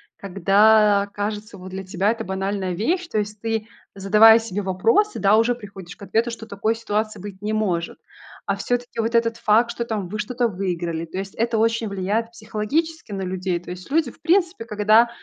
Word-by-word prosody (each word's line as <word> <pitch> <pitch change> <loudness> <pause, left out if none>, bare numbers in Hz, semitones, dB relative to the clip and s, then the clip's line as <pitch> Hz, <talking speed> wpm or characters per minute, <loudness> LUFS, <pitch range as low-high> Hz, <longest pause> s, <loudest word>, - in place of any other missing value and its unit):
когда 200 +2 +3
кажется, 210 0 -4
вот 185 0 -10
для 190 +1 -5
тебя 195 +2 +1
это 230 -1 -4
банальная 190 -1 -2
вещь. 335 - -1
То - - -2
есть 210 0 -5
ты, 225 -1 -2 0.3
задавая 215 +3 +6
себе 210 -3 -4
вопросы, 225 - +1
да, 200 +1 +4
уже 230 +2 +3
приходишь 195 -6 -11
к - - -27
ответу, 225 +4 0
что 230 -1 -8
такой 215 +2 -1
ситуации 215 -1 -2
быть 195 0 -9
не 210 +1 -2
может. 185 -6 -1 0.5
А - - 0
всё-таки 245 -1 -3
вот 230 +1 -1
этот 230 0 +2
факт, 225 +2 +3
что 235 - -3
там 215 -5 -3
вы 210 +4 -5
что-то 240 +3 0
выиграли, 175 -5 -3
то 170 - -8
есть 195 0 -5
это 230 0 0
очень 225 0 +1
влияет 200 +4 -2
психологически 230 +7 -3
на 195 -1 -4
людей. 185 -1 -2
То 175 - -13
есть 180 +7 -9
люди 305 -4 +1
в - - -24
принципе, 345 -3 +1
когда 215 +1 +4
210 Hz, 195 wpm, -22 LUFS, 195-230 Hz, 0.5 s, задавая